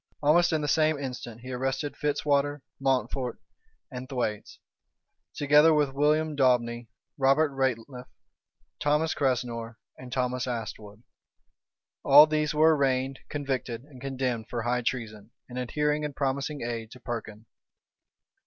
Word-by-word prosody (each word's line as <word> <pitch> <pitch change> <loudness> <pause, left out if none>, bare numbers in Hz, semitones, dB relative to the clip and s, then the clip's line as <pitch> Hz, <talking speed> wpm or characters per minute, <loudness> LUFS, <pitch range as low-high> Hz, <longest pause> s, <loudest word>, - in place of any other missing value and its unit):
Almost 170 +4 +4
in 160 -1 +1
the 150 - -2
same 155 0 +3
instant 125 -4 -6
he 130 +1 -8
arrested 135 +3 -2
Fitzwater, 145 -1 0 0.2
Mountfort, 135 -1 -1 0.5
and 130 0 -7
Thwaites, 115 -6 -3 0.8
together 150 +2 +5
with 145 -3 +1
William 150 +2 +2
Daubeney, 120 -3 +1 0.3
Robert 140 +3 +3
Rateliff, 130 -1 -2 0.7
Thomas 150 +2 +1
Cressenor, 120 -4 -1 0.2
and 130 -1 -10
Thomas 125 0 -1
Astwood. 110 -2 -6 1.0
All 145 +2 +9
these 150 -1 0
were 155 +1 +5
arraigned, 135 -1 0
convicted, 130 -5 -3
and 135 -3 -15
condemned 125 -4 -3
for 120 -2 -3
high 125 +1 0
treason, 110 -3 -4 0.2
in 125 - -8
adhering 150 +4 0
and 150 -2 -4
promising 140 +1 -2
aid 115 -2 -4
to 125 - -13
Perkin. 110 -3 -6
135 Hz, 125 wpm, -27 LUFS, 120-145 Hz, 1.0 s, All